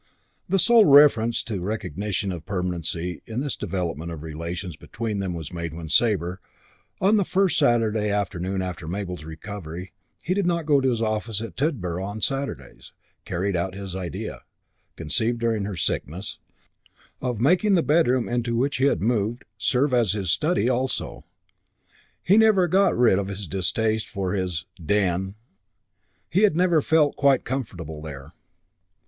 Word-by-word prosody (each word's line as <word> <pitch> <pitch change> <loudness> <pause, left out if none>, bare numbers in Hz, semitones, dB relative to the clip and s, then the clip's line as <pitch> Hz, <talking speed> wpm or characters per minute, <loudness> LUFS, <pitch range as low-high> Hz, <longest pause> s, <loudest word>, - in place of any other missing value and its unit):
The 195 - +3
sole 230 +2 +6
reference 140 -6 +6
to 110 -4 -4
recognition 100 0 -2
of 85 -3 -6
permanency 90 -2 -3
in 115 +3 -3
this 145 -2 -2
development 85 -3 -3
of 80 - -6
the 75 - -9
relations 85 +3 -5
between 105 +5 -4
them 95 -3 -2
was 80 0 -7
made 85 -2 -4
when 80 -1 -7
Sabre, 95 -4 +1 0.6
on 205 +3 +4
the 200 - +3
first 190 -2 +2
Saturday 115 -6 +2
afternoon 95 -2 -1
after 90 -3 -5
Mabel's 90 -2 -4
recovery 85 +1 -8 0.3
he 180 - 0
did 195 -2 0
not 170 -2 0
go 145 -3 +4
to 130 - +2
his 115 -2 0
office 110 0 -1
at 110 -6 -7
Tidborough 95 - -1
on 100 +2 -5
Saturdays 110 - -4 0.3
carried 95 +2 -1
out 90 +2 -2
his 95 -2 -6
idea, 90 -5 -5 0.5
conceived 110 +10 0
during 115 -3 0
her 100 -3 -5
sickness, 85 +4 -2 0.8
of 125 -4 -2
making 185 - +4
the 170 - +3
bedroom 130 -4 +3
into 120 -1 -1
which 140 +4 0
he 130 - +2
had 95 - +2
moved 115 +1 0
serve 130 +2 +1
as 115 -5 +3
his 95 -5 -1
study 155 -5 +1
also. 130 +1 -2 1.0
He 190 - +3
had 220 - +7
never 205 -5 +4
got 195 -1 +3
rid 115 -6 +4
of 100 - -2
his 100 0 -5
distaste 110 +5 -1
for 95 -2 -2
his 90 -5 -2 0.2
"den." 95 +1 0 1.0
He 185 - +3
had 210 -7 +4
never 175 -2 +3
felt 150 -1 +3
quite 140 -2 +3
comfortable 90 - -5
there. 70 -3 -9
105 Hz, 160 wpm, -24 LUFS, 90-130 Hz, 1.0 s, had